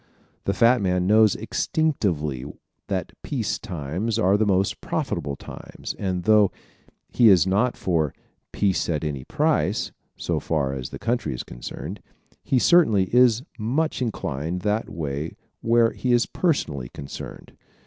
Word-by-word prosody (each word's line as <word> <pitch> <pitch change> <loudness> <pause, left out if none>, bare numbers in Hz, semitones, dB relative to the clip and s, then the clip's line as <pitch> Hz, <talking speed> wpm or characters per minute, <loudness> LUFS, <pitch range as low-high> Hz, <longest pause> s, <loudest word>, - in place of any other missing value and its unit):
The 100 - +1
fat 120 +4 +4
man 90 -2 +1
knows 110 +1 +5
instinctively 85 - -1 0.4
that - - -2
peace 125 -7 -2
times 95 +3 -3
are 100 -3 +3
the 105 0 +2
most 95 -1 +1
profitable 70 -1 -2
times - - -8
and 90 -3 -2
though 105 -1 +5 0.6
he 120 -3 +6
is 90 -4 +6
not 105 +7 +1
for 80 -6 0 0.4
"peace 95 -3 0
at 75 -3 -1
any 70 -4 -3
price" - - 0 0.3
so - - -1
far 70 -4 -1
as 65 -2 -5
the - - -7
country 115 - -1
is - - -5
concerned, - - -7 0.4
he 135 - +1
certainly 120 - +4
is 125 -1 +5 0.2
much 135 +8 0
inclined 85 - -3
that 105 +2 -1
way 75 0 -4 0.3
where 115 0 +4
he 125 -1 0
is 120 -1 +4
personally 75 - -1
concerned. 70 - -9
100 Hz, 140 wpm, -24 LUFS, 75-115 Hz, 0.6 s, he